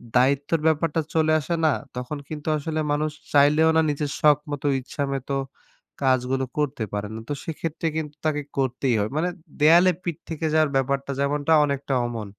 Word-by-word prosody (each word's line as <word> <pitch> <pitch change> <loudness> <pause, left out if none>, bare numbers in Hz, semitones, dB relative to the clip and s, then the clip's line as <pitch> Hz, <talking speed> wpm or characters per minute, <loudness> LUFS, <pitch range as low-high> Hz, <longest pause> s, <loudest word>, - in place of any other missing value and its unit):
দায়িত্বের 140 +5 +2
ব্যাপারটা 160 +1 +1
চলে 155 0 +3
আসে 170 +3 -2
না, 155 - +4 0.2
তখন 125 +4 -4
কিন্তু 150 -1 -7
আসলে 155 +2 -3
মানুষ 155 +1 0 0.2
চাইলেও 150 +3 +5
না - - +6
নিজের 145 0 -2
শখমতো, 150 -1 +2
ইচ্ছামতো 140 0 -3 0.7
কাজগুলো 130 0 +1
করতে 145 -5 -1
পারে 105 0 -2
না। - - -5
তো - - 0
সেক্ষেত্রে 165 0 -3
কিন্তু 150 -2 -4
তাকে 150 -1 +1 0.2
করতেই 130 -2 +1
হয়। 105 +1 0
মানে 175 +3 +1 0.3
দেয়ালে 170 +4 +7
পিঠ 170 -4 -3
থেকে 160 0 -3
যাওয়ার 155 -2 +3
ব্যাপারটা 140 +1 -1
যেমনটা, 145 +2 +1
অনেকটা 140 -1 -2
অমন। 110 -4 -5
145 Hz, 160 wpm, -24 LUFS, 135-155 Hz, 0.7 s, দেয়ালে